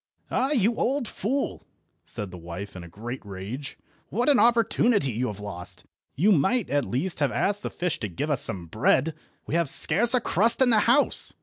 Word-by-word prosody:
"Ah, 260 +2 +1
you 235 -5 +1
old 270 -1 0
fool!" 265 +9 -3 0.4
said 105 -5 -7
the 90 - -9
wife 85 +4 -8
in 90 - -8
a - - -10
great 120 +8 -7
rage, 105 +8 -7 0.3
"what 240 +7 0
an 280 - +5
opportunity 230 - +3
you 120 +3 -2
have 105 -3 -6
lost. 95 -4 -6 0.3
You 195 +9 +3
might, 195 - +1
at 145 -1 +1
least, 165 +10 -3
have 145 -2 +1
asked 205 +1 0
the - - -4
fish 180 -3 -2
to 110 - -3
give 145 - -3
us 140 - +1
some 95 -6 -2
bread. 130 - +1 0.3
We - - -6
have 170 -3 +2
scarce 230 - +3
a - - +4
crust 225 +1 +3
in 260 -2 +4
the 220 - +5
house." 280 +4 +4
155 Hz, 200 wpm, -25 LUFS, -, 0.4 s, an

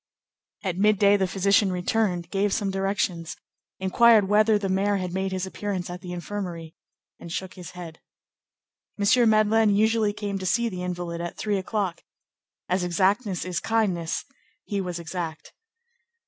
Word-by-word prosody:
At 185 -2 -2
midday 205 -1 +5
the 190 -2 +1
physician 195 +1 +2
returned, 180 -1 -1
gave 200 0 +1
some 200 -2 0
directions, 190 -3 -2 0.4
inquired 210 +2 +5
whether 215 +1 +4
the 200 -1 -2
mayor 195 +2 +1
had 180 -2 -3
made 190 0 -1
his 185 0 -2
appearance 190 -2 -4
at 180 - -7
the 180 -2 -7
infirmary, 175 -3 -5 0.5
and 170 - -9
shook 185 +2 -4
his 180 -2 -10
head. 165 -2 -8 1.0
M. 225 +3 +4
Madeleine 215 -1 +4
usually 220 0 +3
came 205 -1 -4
to 190 - -5
see 235 +4 +2
the 185 -3 -6
invalid 175 -1 -4
at 175 - -5
three 205 -2 0
o'clock. 190 -2 -2 0.7
As 185 0 0
exactness 190 +3 +1
is 180 -1 -2
kindness, 195 -7 -1 0.4
he 200 -2 -2
was 180 -2 -4
exact. 165 -1 -6
190 Hz, 150 wpm, -25 LUFS, 180-205 Hz, 1.0 s, midday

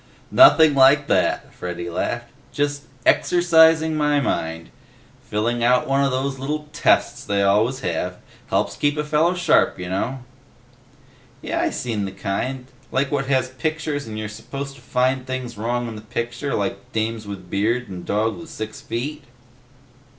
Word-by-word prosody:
"Nothing 160 - +7
like 140 +2 +6
that," - - +1
Freddy 85 -1 -5
laughed. 120 +7 -3 0.2
"Just, 145 0 -2 0.2
exercising 160 -2 +4
my 150 -1 +2
mind. 80 -10 -2 0.6
Filling 115 +3 0
out 125 +1 +3
one 135 +1 +2
of 140 - +2
those 135 +1 -2
little 150 +3 -3
tests - - +2
they 100 0 0
always 110 +7 +2
have. 90 0 -2 0.3
Helps - - 0
keep 145 +1 +1
a 150 - 0
fella 155 +4 +2
sharp, 175 -3 +3
you 90 -1 -6
know." 120 +8 -3 1.2
"Yeh, - - -3
I 340 - +1
seen 115 - -3
the 95 - -5
kind. 125 +7 -3 0.3
Like 135 +1 0
what 135 -2 -1
has 130 -2 +1
pictures 150 0 -3
and 110 -1 -6
you're 110 0 -3
supposed 135 +6 -7
to 135 - -16
find 130 +1 0
things 130 -2 -4
wrong 120 +3 -2
in 115 - -6
the 105 - -8
picture 120 +4 -3
like 100 0 -3
dames 110 -1 -2
with 95 -3 -8
beards 115 +5 0
and 90 -3 -8
dogs 110 +5 -1
with 165 - -11
six 110 0 -7
feet?" 140 +6 -4
125 Hz, 160 wpm, -22 LUFS, 110-145 Hz, 1.2 s, Nothing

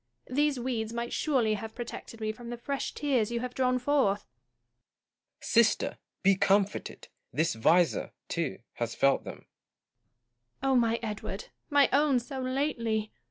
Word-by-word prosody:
These 290 0 +2
weeds 235 -3 -2
might 235 0 -3
surely 250 -8 +2
have 220 +1 -5
protected 235 -1 -7
me 215 -1 -1
from 235 +2 -10
the 240 - -4
fresh 275 +3 -3
tears 260 -7 +1
you 235 0 -2
have 250 0 -4
drawn 255 -1 +2
forth. 250 -6 +2
Gaunt. 120 -1 -35
Sister, - - +3 0.2
be 195 0 +6
comforted! 200 +1 +1 0.2
this 165 +2 +1
visor, 165 +10 +3 0.2
too, 165 -8 -2
has 115 -1 -3
felt 135 0 +3
them. - - -9 1.2
Joanna. 270 -1 +3
my 230 -1 +2
Edward! 210 -2 -5 0.2
my 285 -2 +5
own 285 -1 +4
so 255 +3 -6
lately 235 -5 -1
230 Hz, 145 wpm, -29 LUFS, 195-255 Hz, 1.2 s, be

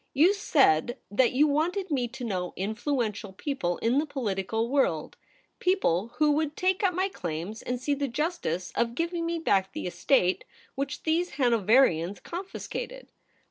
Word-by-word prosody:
You 330 +8 +6
said 265 - +3
that 245 +4 +3
you 280 +4 +5
wanted 330 +6 0
me 255 -4 +1
to 250 +2 -9
know 185 -6 -2
influential 215 0 -2
people 195 - -2
in 240 +5 +3
the 310 - -1
political 225 -4 -2
world 240 - 0 0.2
— - - -33 0.2
people 235 - +1
who 300 +1 +3
would 305 0 0
take 370 0 +1
up 365 -3 +2
my 375 +2 +1
claims 175 - -5
and 250 0 -3
see 285 +3 0
the 280 0 -1
justice 265 - -2
of 235 0 0
giving 335 +1 -1
me 335 0 -1
back 195 - +1
the - - -5
estate 180 +2 +2 0.3
which 275 +1 -4
these 335 +3 0
Hanoverians 215 - +3
con 355 +3 -6
fiscated. - - -6
260 Hz, 165 wpm, -28 LUFS, 200-315 Hz, 0.3 s, You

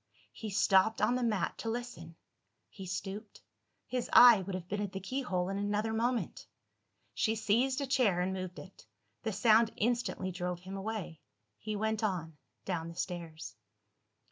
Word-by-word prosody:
He 220 - -7
stopped 200 +1 +3
on - - +3
the 250 - 0
mat 225 -4 0
to 225 - -3
listen 225 -9 -5 0.5
he 195 -2 -9
stooped 195 +3 -6 0.4
his 250 -1 -3
eye 235 -5 +9
would 190 0 -4
have 180 -2 -6
been 205 +2 -2
at 200 -2 -4
the 190 - -3
keyhole 190 -4 -2
in 195 +1 -2
another 210 +2 -1
moment. 235 +2 -1 0.7
She 220 0 +1
seized 245 +6 +1
a - - 0
chair, 250 -9 +2
and 185 +1 0
moved 185 -1 -5
it. 190 - -12 0.3
The 220 - -2
sound 220 +2 +4
instantly 235 -4 -1
drove 180 -1 -4
him 190 +2 -7
away. 195 -6 -5 0.4
He 215 -1 -4
went 220 +1 -1
on, 170 -6 -2 0.3
down 170 -3 -2
the 170 - -9
stairs. 170 - -5
205 Hz, 165 wpm, -32 LUFS, 185-225 Hz, 0.7 s, eye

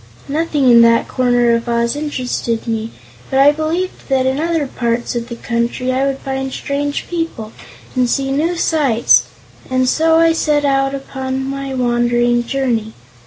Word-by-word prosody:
Nothing 295 -2 0
in 235 -1 +7
that 230 0 +4
corner 245 -2 +2
of 230 +1 -1
Oz 235 +1 0
interested 255 -6 -3
me, 225 -1 -2 0.4
but 265 - 0
I 275 +2 +6
believed 315 +5 -3
that 265 -1 +2
in 265 +2 0
other 325 -2 0
parts 240 -2 -2
of 235 0 -3
the 235 - -5
country 235 +2 -2
I 265 +2 +1
would 270 -1 -2
find 265 0 -4
strange 285 +1 -3
people 330 -11 -4 0.4
and 250 -1 +2
see 270 +1 0
new 320 +6 0
sights, 235 - +3 0.4
and 255 0 +1
so 320 +4 +3
I 330 0 +4
set 300 -2 +1
out 270 0 +1
upon 265 -1 -4
my 275 0 -4
wandering 240 -1 +1
journey. 235 -5 -1
265 Hz, 165 wpm, -17 LUFS, 240-285 Hz, 0.4 s, in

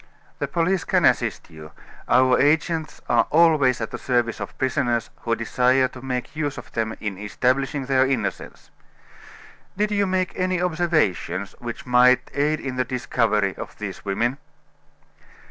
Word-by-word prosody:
"The - - -1
police 175 +1 0
can - - +2
assist - - +1
you 80 -1 -12 0.4
our 125 +1 +4
agents 160 +2 +1
are - - +3
always 155 -6 +4
at 110 - -4
the - - -6
service 120 -2 0
of - - -7
prisoners 125 -3 0
who 115 -1 -1
desire 125 +3 +2
to 130 - -12
make 125 +2 -4
use 145 -2 -2
of - - -10
them 110 -1 -2
in 100 -3 -5
establishing 130 +6 -1
their 135 0 +3
innocence. 135 -1 -4 1.1
Did 210 +1 0
you 200 -1 +1
make 185 0 -1
any 185 -1 0
observations 160 - 0
which 120 -1 -7
might 125 0 +4
aid 150 +2 +1
in 130 -2 -5
the 125 - +2
discovery 115 -5 0
of - - -8
these - - -6
women?" 120 +7 -1
130 Hz, 150 wpm, -23 LUFS, 120-155 Hz, 1.1 s, our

